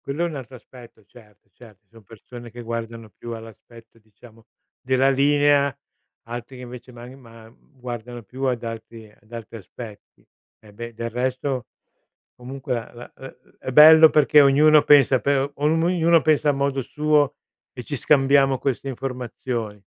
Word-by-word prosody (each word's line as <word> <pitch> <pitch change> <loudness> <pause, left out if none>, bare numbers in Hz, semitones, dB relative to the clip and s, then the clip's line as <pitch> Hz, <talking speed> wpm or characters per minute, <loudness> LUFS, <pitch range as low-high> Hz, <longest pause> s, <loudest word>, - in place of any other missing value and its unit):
Quello 145 +5 -2
è - - -1
un 160 - -7
altro 130 -1 -9
aspetto, 120 -2 -16
certo, 105 -3 -21
cer 115 -4 -17
ci 105 - -52
son 115 +2 -19
persone 120 +3 -13
che 120 +1 -11
guardano 115 -1 -7
più 120 - -8
all'aspetto, 115 +1 -14
diciamo 110 +1 -20 0.4
della 130 +1 +2
linea, 140 0 +2 0.5
altri 120 +2 -8
che 125 - -10
invece 125 +1 -11
man 120 +1 -12
ma 115 -2 -16
uhm, 130 +4 -26
guardano 120 -1 -8
più 130 +6 -9
ad 125 -3 -1
altri 115 -1 -9
ad 105 +1 -28
altri 115 -1 -9
aspetti. 110 +1 -13 0.3
E 105 -2 -19
beh, 120 +2 -9
del 115 +1 -5
resto, 130 0 -3 0.7
comunque 130 0 -5
a 115 +1 -9
la 120 0 -12
uhm, 135 - -11 0.3
è - - -22
è - - -1
bello 160 +2 +9
perché 150 0 +4
ognuno 150 +2 +5
pensa 140 -3 +5
per 140 +1 0
om 155 +3 0
ognuno 170 -1 +3
pensa 155 -1 +2
a - - +2
modo 140 0 -1
suo, 150 +1 0 0.4
e 125 - -8
ci 145 +3 -5
scambiamo 135 -1 +3
queste 135 0 -3
informazioni. 125 -5 -6
125 Hz, 170 wpm, -22 LUFS, 115-140 Hz, 0.7 s, bello